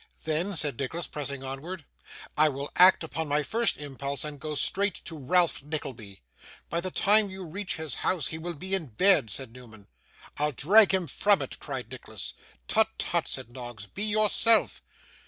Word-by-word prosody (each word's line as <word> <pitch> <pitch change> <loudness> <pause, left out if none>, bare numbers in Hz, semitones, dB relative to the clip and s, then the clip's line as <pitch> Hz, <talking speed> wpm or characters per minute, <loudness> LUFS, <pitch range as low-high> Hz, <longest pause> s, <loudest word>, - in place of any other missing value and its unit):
'Then,' 165 +5 -1
said 150 -6 +1
Nicholas, 160 +5 -3
pressing 140 -3 -5
onward, 145 +5 -7 0.5
'I 155 +1 +4
will 140 +1 -6
act 180 -1 +6
upon 160 0 -4
my 145 +1 +1
first 230 +8 +2
impulse, 140 -1 -4
and 150 -2 -6
go 155 0 -5
straight 200 +5 +1
to 165 - -7
Ralph 165 +5 +1
Nickleby.' 125 - -7 0.5
'By 170 - 0
the 185 - -3
time 205 +2 +3
you 190 -1 -8
reach 190 +4 -4
his 160 -5 -4
house 180 -5 0
he 160 - -5
will 170 +1 -5
be 190 +6 -5
in 180 -6 -1
bed,' 145 - +3
said 120 +4 -4
Newman. 115 -5 -14 0.5
'I'll 150 0 0
drag 200 - +5
him 190 -2 +1
from 205 +4 +2
it,' - - -8
cried 130 -5 -6
Nicholas. 110 -6 -6 0.3
'Tut, - - +3
tut,' - - -1
said 115 - -2
Noggs. 120 -4 -8
'Be 190 - -9
yourself. 215 +1 +4
155 Hz, 175 wpm, -27 LUFS, 135-185 Hz, 0.5 s, act